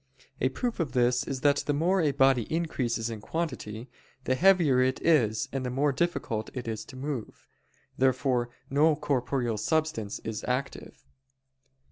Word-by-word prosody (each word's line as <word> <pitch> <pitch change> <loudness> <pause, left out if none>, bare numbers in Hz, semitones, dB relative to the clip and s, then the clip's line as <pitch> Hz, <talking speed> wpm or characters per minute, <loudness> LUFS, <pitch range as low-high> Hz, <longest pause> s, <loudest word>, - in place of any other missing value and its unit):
A - - +2
proof 240 -4 -3
of 150 -7 -2
this 125 -1 +2
is 135 -2 -4
that 145 0 +4
the 145 - -1
more 180 +5 +2
a 150 -3 +2
body 135 -4 +3
increases 120 -8 -1
in 110 -2 -6
quantity, 125 -7 -4 0.4
the 130 - +1
heavier 165 -5 +4
it 130 0 +1
is 115 -10 +3
and 135 -1 -2
the 125 - -2
more 140 +3 +1
difficult 130 -7 -2
to 115 0 -5
move. 130 -3 -6 0.5
Therefore 130 -2 +2 0.2
no 150 +3 +3
corporeal 125 -5 -1
substance 110 -3 -1
is 110 -1 -4
active. 130 +2 -4
130 Hz, 145 wpm, -28 LUFS, 120-150 Hz, 0.5 s, that